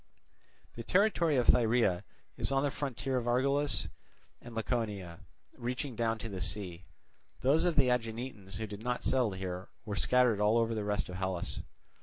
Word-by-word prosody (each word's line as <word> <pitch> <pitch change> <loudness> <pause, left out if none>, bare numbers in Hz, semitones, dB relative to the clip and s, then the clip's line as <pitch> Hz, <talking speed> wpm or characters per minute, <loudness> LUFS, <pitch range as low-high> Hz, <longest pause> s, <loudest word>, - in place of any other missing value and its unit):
The 115 - -6
territory 175 - +3
of 125 -2 +3
Thyrea 115 -6 +4 0.3
is - - -1
on 135 0 +2
the 145 - +1
frontier 135 -1 -2
of 120 -1 -2
Argolis 140 +4 +2 0.5
and 120 -1 -10
Laconia, 105 -7 -2 0.4
reaching 125 +2 -3
down 115 0 0
to 110 - -6
the 95 -4 -5
sea. 90 -2 -2 0.6
Those 150 +6 +3
of 175 -2 +2
the 135 -4 +4
Aeginetans 115 -4 -3
who 110 - -3
did 105 0 -8
not 125 +1 -2
settle 125 -6 +2
here 95 0 -5 0.2
were 105 -2 -3
scattered 125 0 +3
over 115 +2 +3
the 110 -2 -2
rest 105 0 -1
of 90 - -6
Hellas. 95 -2 -2
115 Hz, 165 wpm, -32 LUFS, 100-130 Hz, 0.6 s, Thyrea